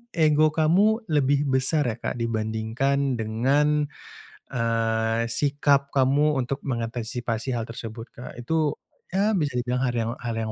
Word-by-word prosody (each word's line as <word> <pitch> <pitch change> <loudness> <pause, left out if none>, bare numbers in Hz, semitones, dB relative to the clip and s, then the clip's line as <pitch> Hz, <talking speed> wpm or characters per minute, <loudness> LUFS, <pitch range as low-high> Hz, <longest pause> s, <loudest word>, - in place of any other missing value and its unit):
ego 155 -1 +4
kamu 200 +9 +3
lebih 145 -1 +3
besar 135 +3 +2
ya 110 - -7
Kak - - -3
dibandingkan 115 +4 -1
dengan, 140 +7 +2 0.7
eee, 115 0 0
sikap 140 +1 +1
kamu 140 +3 +3
untuk 135 +2 -2
mengantisipasi 120 0 -3
hal 115 - -2
tersebut 115 0 -8
Kak. 120 - -10
Itu, 150 +5 0 0.4
ya 205 +3 +3
bisa 145 -7 -1
dibilang 125 +1 -1
har 120 - -2
yang 115 0 -1
hal 115 -2 -4
yang 110 - -3
125 Hz, 135 wpm, -25 LUFS, 115-145 Hz, 0.7 s, ego